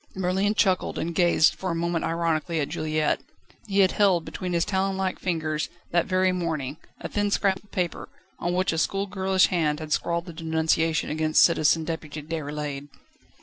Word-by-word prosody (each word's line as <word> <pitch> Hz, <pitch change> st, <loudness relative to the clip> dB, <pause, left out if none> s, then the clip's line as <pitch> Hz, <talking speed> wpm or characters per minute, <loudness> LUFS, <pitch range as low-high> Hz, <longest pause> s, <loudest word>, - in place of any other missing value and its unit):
Merlin 190 Hz, +3 st, 0 dB
chuckled, 190 Hz, -4 st, +1 dB
and 170 Hz, +1 st, -2 dB
gazed 170 Hz, -2 st, +4 dB
for 190 Hz, -, -5 dB
a 170 Hz, -, -1 dB
moment 170 Hz, 0 st, -1 dB
ironically 165 Hz, 0 st, 0 dB
at 145 Hz, -, -1 dB
Juliette. 155 Hz, -1 st, 0 dB, 0.5 s
He 200 Hz, -1 st, +3 dB
had 190 Hz, -, +4 dB
held, 190 Hz, -5 st, +3 dB
between 180 Hz, -1 st, -5 dB
his 170 Hz, -1 st, +2 dB
talon 190 Hz, 0 st, 0 dB
like 190 Hz, -1 st, -2 dB
fingers, 155 Hz, -3 st, -2 dB, 0.2 s
that 175 Hz, -1 st, +2 dB
very 185 Hz, 0 st, +2 dB
morning, 160 Hz, -6 st, -3 dB, 0.2 s
a -, -, -5 dB
thin 205 Hz, 0 st, 0 dB
scrap 195 Hz, -1 st, +1 dB
of 205 Hz, -, -25 dB
paper, 180 Hz, -2 st, -3 dB, 0.3 s
on 175 Hz, +1 st, -1 dB
which 185 Hz, -1 st, +1 dB
a 160 Hz, -, -1 dB
schoolgirlish 190 Hz, 0 st, +1 dB
hand 155 Hz, -5 st, 0 dB
had 155 Hz, -1 st, -3 dB
scrawled 170 Hz, 0 st, -1 dB
the 170 Hz, -, -9 dB
denunciation 160 Hz, -1 st, 0 dB
against 155 Hz, 0 st, +3 dB
Citizen 160 Hz, -1 st, +3 dB
Deputy 155 Hz, -2 st, -5 dB
Déroulède. 150 Hz, -2 st, -4 dB
170 Hz, 175 wpm, -25 LUFS, 155-185 Hz, 0.5 s, gazed